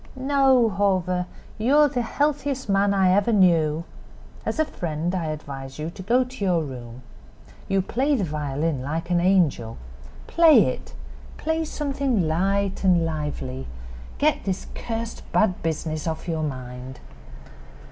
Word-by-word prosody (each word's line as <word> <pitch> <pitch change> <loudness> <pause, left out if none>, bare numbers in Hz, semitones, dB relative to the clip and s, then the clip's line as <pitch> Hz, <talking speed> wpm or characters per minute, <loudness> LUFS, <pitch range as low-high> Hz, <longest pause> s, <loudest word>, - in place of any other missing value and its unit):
"No, 265 -2 +3
Hawver; 185 -3 0 0.3
you 255 +7 +3
are 300 0 +7
the 250 -3 -1
healthiest 285 +1 -1
man 200 0 +3
I 190 -2 +3
ever 205 +4 +3
knew. 165 -6 +3 0.6
As - - -1
a 315 - +3
friend 170 - -3
I 180 -3 -1
advise 140 -3 -6
you 155 +2 -4
to 185 - -10
go 240 +7 +3
to 250 -3 -8
your 175 -4 +2
room. 125 -3 -8 0.6
You 195 -1 +1
play 275 +8 +1
the 220 - 0
violin 150 -2 -2
like 160 +6 -3
an 175 -1 +3
angel. 170 -12 +2 0.5
Play 330 -2 +6
it; - - -5 0.4
play 320 0 -1
something 275 - -1
light 195 +5 0
and 175 -3 +4
lively. 145 -5 -4 0.5
Get 305 +1 +2
this 190 -1 -3
cursed 230 -1 -5
bad 190 -4 +2
business 155 -1 -3
off 160 +2 -4
your 160 -2 -1
mind." 130 -3 -6
185 Hz, 145 wpm, -24 LUFS, 155-235 Hz, 0.6 s, are